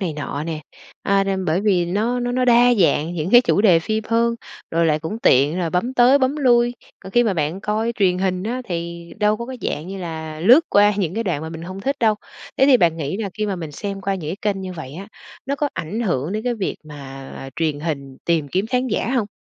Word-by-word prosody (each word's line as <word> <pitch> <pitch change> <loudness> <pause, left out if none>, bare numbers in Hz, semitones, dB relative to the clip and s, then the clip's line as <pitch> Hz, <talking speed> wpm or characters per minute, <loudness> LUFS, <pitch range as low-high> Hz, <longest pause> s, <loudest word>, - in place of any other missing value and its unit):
này 180 -5 -2
nọ 145 0 -4
nè, 160 -2 -4 0.4
à, 195 0 +2
nên 190 -1 -1
bởi 165 +2 +1
vì 190 -4 +2
nó 220 +7 0
nó 245 0 -2
nó 255 0 +1
đa 245 0 +5
dạng 170 -4 +2
những 165 +2 -3
cái 245 - +8
chủ 240 - +2
đề 185 -6 +6
phim 215 +4 -2
hơn, 235 0 +2 0.4
rồi 165 0 +2
lại 155 -1 +2
cũng 160 +8 -5
tiện 145 +7 +4
rồi 170 -2 -1
bấm 235 +10 -1
tới 255 +3 +6
bấm 260 +2 +1
lui. 240 -3 +3 0.3
Còn 190 - -11
khi 240 - +5
mà 205 -4 +1
bạn 155 +4 -2
coi 215 +3 -1
truyền 185 -3 +3
hình 185 -1 -1
á 245 +5 -3
thì 170 -2 -5
đâu 210 0 +3
có 235 +2 -6
cái 260 -1 -6
dạng 155 +4 -3
như 195 0 -6
là 160 -3 -6
lướt 245 - +7
qua 205 +1 +5
những 180 -3 -1
cái 230 +1 -2
đoạn 160 -6 -1
mà 160 - -5
mình 165 0 -8
hông 185 +2 -7
thích 275 +6 -1
đâu. 220 -2 +4 0.4
Thế 270 - +4
thì 275 -2 +7
bạn 170 -7 +2
nghĩ 150 +2 -3
là 205 -3 -3
khi 215 - 0
mà 195 -2 -2
mình 160 -3 -6
xem 195 +5 -5
qua 195 0 -1
những 170 -2 -4
cái 210 -1 +2
kênh 195 - -6
như 185 - -5
vậy 150 -6 -8
á, 195 +6 -8 0.4
nó 280 +1 -1
có 290 0 0
ảnh 190 +9 -4
hưởng 170 - -1
đến 215 +2 -3
cái 245 -1 0
việc 205 -4 -3
mà 135 -2 -9
truyền 155 -3 -1
hình 140 -4 -4
tìm 165 -4 +1
kiếm 190 +8 -1
khán 250 +2 0
giả 225 +1 -1
hông? 235 -5 +1
190 Hz, 255 wpm, -21 LUFS, 165-230 Hz, 0.4 s, cái